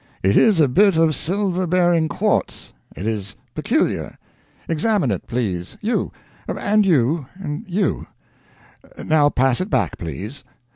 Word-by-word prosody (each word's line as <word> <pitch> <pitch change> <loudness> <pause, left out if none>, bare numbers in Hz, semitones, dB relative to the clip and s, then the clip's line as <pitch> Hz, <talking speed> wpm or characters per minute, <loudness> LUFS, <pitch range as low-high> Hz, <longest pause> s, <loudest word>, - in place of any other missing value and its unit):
It 95 +1 +3
is 210 -6 +5
a 150 - +5
bit 195 +7 +4
of 160 -1 +3
silver 185 +2 -1
bearing 175 -2 +2
quartz. - - -1 0.2
It 95 - -6
is 105 -3 -3 0.2
peculiar. - - -1 0.5
Examine 170 - +1
it, 95 - -4
please 95 -7 -3
you 225 +3 -1 0.4
and 210 +1 +1
you 145 -2 +2
and 150 -6 -6
you. 185 -1 -1 1.0
Now 150 -2 +4
pass 130 +2 +1
it 185 - -3
back, - - 0
please. 95 - -6
155 Hz, 135 wpm, -21 LUFS, 120-185 Hz, 1.0 s, is